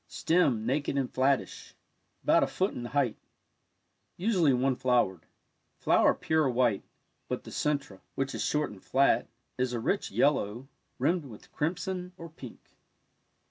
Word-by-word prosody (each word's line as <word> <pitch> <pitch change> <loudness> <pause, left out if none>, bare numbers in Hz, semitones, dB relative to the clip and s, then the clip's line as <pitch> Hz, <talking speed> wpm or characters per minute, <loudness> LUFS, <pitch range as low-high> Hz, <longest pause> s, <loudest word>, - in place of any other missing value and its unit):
— - - -46 0.2
Stem 140 -10 +3
naked 140 +3 0
and 135 -2 -1
flattish 135 +1 0 0.2
— - - -46
about - - +4
a - - +2
foot 190 +2 -1
in 120 - -6
height 130 -3 0 0.6
— - - -48
usually 180 -10 +4
one 130 +1 +2
flowered. 120 -10 +1 0.5
Flower - - +3
pure 160 -3 +1
white, 120 -4 +2 0.5
but - - -3
the - - -10
cen 150 -1 +1
tre, 100 -9 -15 0.2
which 135 0 -2
is - - -2
short 150 -4 0
and 100 -2 -13
flat, 135 +1 +2 0.3
is 125 -1 0
a 120 - -1
rich 195 - -1
yellow, 130 -3 +1 0.3
rimmed 160 +4 +1
with 110 -6 -13
crimson 180 +3 -3
or 165 - -9
pink. 135 -6 -11
135 Hz, 160 wpm, -29 LUFS, 125-160 Hz, 0.6 s, about